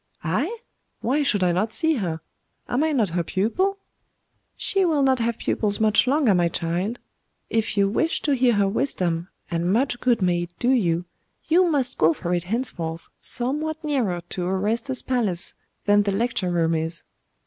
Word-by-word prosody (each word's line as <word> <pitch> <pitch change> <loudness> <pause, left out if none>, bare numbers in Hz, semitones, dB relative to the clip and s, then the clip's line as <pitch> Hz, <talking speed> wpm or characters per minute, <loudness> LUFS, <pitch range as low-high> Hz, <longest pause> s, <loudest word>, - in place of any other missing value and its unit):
'I? 275 - -1 0.4
Why 270 +6 +1
should 210 -9 +2
I 180 - +3
not 200 +6 0
see 320 +3 +1
her? 165 -7 -3 0.5
Am 250 +5 +1
I 315 - +1
not 230 -9 +1
her 170 +1 -1
pupil?' 280 - 0 0.8
'She 390 -1 +1
will 310 -5 +2
not 265 -1 +3
have 230 0 0
pupils 205 -2 0
much 220 +3 +3
longer, 270 -5 +3
my 175 -2 +3
child. 175 +8 -2 0.5
If 225 -2 0
you 200 0 +4
wish 320 +11 0
to 290 - +2
hear 250 -2 +3
her 200 -2 +2
wisdom 180 -7 0 0.2
and 170 +1 0
much 245 +3 +1
good 240 -2 +2
may 175 -1 +2
it 175 0 -6
do 245 - +1
you 175 -9 +1 0.4
you 350 +2 +4
must 270 -4 0
go 160 +1 +5
for 175 +2 -3
it 175 0 -1
henceforth 175 -7 -3
somewhat 305 +6 -1
nearer 240 - 0
to 180 - -4
Orestes's 225 +7 -1
palace 215 -9 -1 0.3
than 205 0 +5
the 200 0 0
lecture 205 -3 0
room 165 -2 +1
is. 160 +1 -2
215 Hz, 175 wpm, -24 LUFS, 175-265 Hz, 0.8 s, go